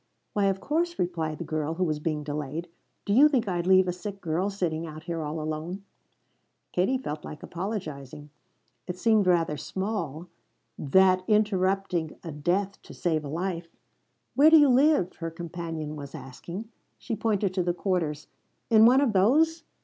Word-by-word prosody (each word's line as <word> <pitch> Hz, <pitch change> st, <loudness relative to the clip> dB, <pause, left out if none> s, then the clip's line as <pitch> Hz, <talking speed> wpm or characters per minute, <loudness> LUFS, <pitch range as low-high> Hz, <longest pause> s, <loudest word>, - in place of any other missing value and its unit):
"Why 205 Hz, -1 st, +2 dB
of 195 Hz, -1 st, +1 dB
course," 335 Hz, -, -1 dB
replied 165 Hz, -3 st, -2 dB
the -, -, -5 dB
girl 155 Hz, 0 st, -2 dB
who 185 Hz, -, 0 dB
was 155 Hz, -4 st, -1 dB
being 150 Hz, -1 st, -2 dB
delayed. 150 Hz, +3 st, -4 dB, 0.4 s
"Do 200 Hz, -, 0 dB
you 285 Hz, +7 st, +7 dB
think 255 Hz, -7 st, +1 dB
I'd 175 Hz, -2 st, -1 dB
leave 185 Hz, 0 st, +5 dB
a 180 Hz, -, 0 dB
sick 200 Hz, +2 st, -7 dB
girl 175 Hz, +3 st, -1 dB
sitting 170 Hz, -5 st, -2 dB
out 155 Hz, 0 st, -9 dB
here 165 Hz, -1 st, -3 dB
all 155 Hz, +1 st, -4 dB
alone?" 155 Hz, +5 st, -4 dB, 0.9 s
Kate 255 Hz, +9 st, 0 dB
felt 150 Hz, 0 st, -5 dB
like 150 Hz, -, -9 dB
apologizing. 155 Hz, -, -6 dB, 0.6 s
It 180 Hz, 0 st, -4 dB
seemed 215 Hz, -1 st, +3 dB
rather 165 Hz, -4 st, +2 dB
small 180 Hz, -3 st, -4 dB, 0.5 s
that 185 Hz, +5 st, +4 dB
interrupting 195 Hz, -5 st, +1 dB
a 165 Hz, -, -6 dB
death 185 Hz, +7 st, -1 dB
to -, -, -13 dB
save 160 Hz, -3 st, 0 dB
a 145 Hz, -, -6 dB
life. 170 Hz, +2 st, -3 dB, 0.7 s
"Where 290 Hz, +3 st, +6 dB
do 320 Hz, -, +8 dB
you 290 Hz, -2 st, +6 dB
live?" 265 Hz, -, +3 dB
her 165 Hz, -1 st, -4 dB
companion 165 Hz, -2 st, -6 dB
was 140 Hz, -2 st, -8 dB
asking. 175 Hz, -, -8 dB, 0.3 s
She 230 Hz, -, -4 dB
pointed 205 Hz, -3 st, 0 dB
to 185 Hz, -, 0 dB
the 175 Hz, 0 st, +1 dB
quarters. 175 Hz, -5 st, -2 dB, 0.5 s
"In 220 Hz, 0 st, +8 dB
one 260 Hz, +3 st, +5 dB
of 260 Hz, -6 st, +2 dB
those?" 310 Hz, -, +3 dB
180 Hz, 170 wpm, -27 LUFS, 155-205 Hz, 0.9 s, do